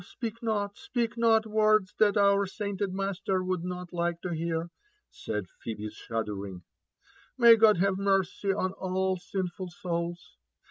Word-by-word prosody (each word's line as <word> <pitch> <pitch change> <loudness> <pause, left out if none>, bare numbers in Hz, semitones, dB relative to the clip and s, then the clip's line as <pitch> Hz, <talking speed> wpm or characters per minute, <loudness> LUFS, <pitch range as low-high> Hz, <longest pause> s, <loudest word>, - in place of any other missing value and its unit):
speak 230 +4 -6
not, 205 -3 -1
speak 240 - -2
not 225 -1 +4
words 215 -2 +3
that 210 -1 +4
our 200 0 +4
sainted 200 0 -3
master 195 -1 -1
would 185 -2 -2
not 180 0 -6
like 170 -1 -1
to 180 - -5
bear," 165 0 -2 0.4
said 105 -3 -4
Phebe, 110 -2 -5
shuddering. 100 -5 -5 0.4
'* - - -40 0.3
May 235 -2 +9
God 220 -2 +5
have 190 +1 +1
mercy 195 0 +1
on 185 -1 -1
all 190 0 -1
sinful 180 0 -4
souls! 170 0 -4
190 Hz, 145 wpm, -29 LUFS, 175-205 Hz, 0.4 s, May